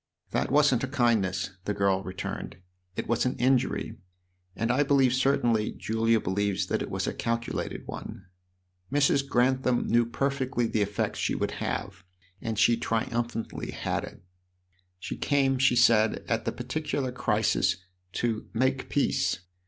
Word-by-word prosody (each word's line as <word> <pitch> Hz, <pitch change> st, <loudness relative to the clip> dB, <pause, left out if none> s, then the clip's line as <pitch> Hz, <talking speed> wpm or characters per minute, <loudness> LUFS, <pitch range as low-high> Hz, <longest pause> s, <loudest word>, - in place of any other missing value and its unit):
"That -, -, 0 dB
wasn't 140 Hz, -3 st, +4 dB
a -, -, 0 dB
kindness," 110 Hz, -8 st, +1 dB
the 105 Hz, -, -1 dB
girl 100 Hz, -1 st, +2 dB
returned; 95 Hz, -1 st, -6 dB, 0.4 s
"it -, -, -3 dB
was 120 Hz, 0 st, +1 dB
an 125 Hz, -, -1 dB
injury, 130 Hz, +1 st, +1 dB, 0.6 s
and 115 Hz, +1 st, 0 dB
I 130 Hz, +4 st, +2 dB
believe 135 Hz, -3 st, +4 dB
certainly 120 Hz, -5 st, +2 dB
Julia 115 Hz, +1 st, +1 dB
believes 100 Hz, 0 st, 0 dB
that -, -, 0 dB
it -, -, -4 dB
was -, -, -2 dB
a -, -, -2 dB
calculated 115 Hz, 0 st, -3 dB
one. 110 Hz, -3 st, -8 dB, 0.7 s
Mrs. 140 Hz, -1 st, +2 dB
Grantham 130 Hz, 0 st, +2 dB
knew 120 Hz, 0 st, +3 dB
perfectly 130 Hz, -1 st, -1 dB
the 110 Hz, -1 st, 0 dB
effect 100 Hz, 0 st, -1 dB
she -, -, 0 dB
would -, -, -1 dB
have, 95 Hz, -1 st, -4 dB, 0.4 s
and 110 Hz, -2 st, -3 dB
she 115 Hz, +2 st, +4 dB
triumphantly 115 Hz, 0 st, -2 dB
had -, -, -2 dB
it. -, -, -10 dB, 0.7 s
She 90 Hz, -, -6 dB
came, 135 Hz, -2 st, +2 dB
she 130 Hz, -2 st, +4 dB
said, 115 Hz, -3 st, +4 dB
at 115 Hz, 0 st, -1 dB
the -, -, 0 dB
particular 135 Hz, +1 st, -3 dB
crisis, 105 Hz, -5 st, +1 dB, 0.4 s
to 115 Hz, -2 st, -2 dB
'make 130 Hz, +3 st, 0 dB
peace.' 140 Hz, -, +1 dB
120 Hz, 145 wpm, -28 LUFS, 110-130 Hz, 0.7 s, wasn't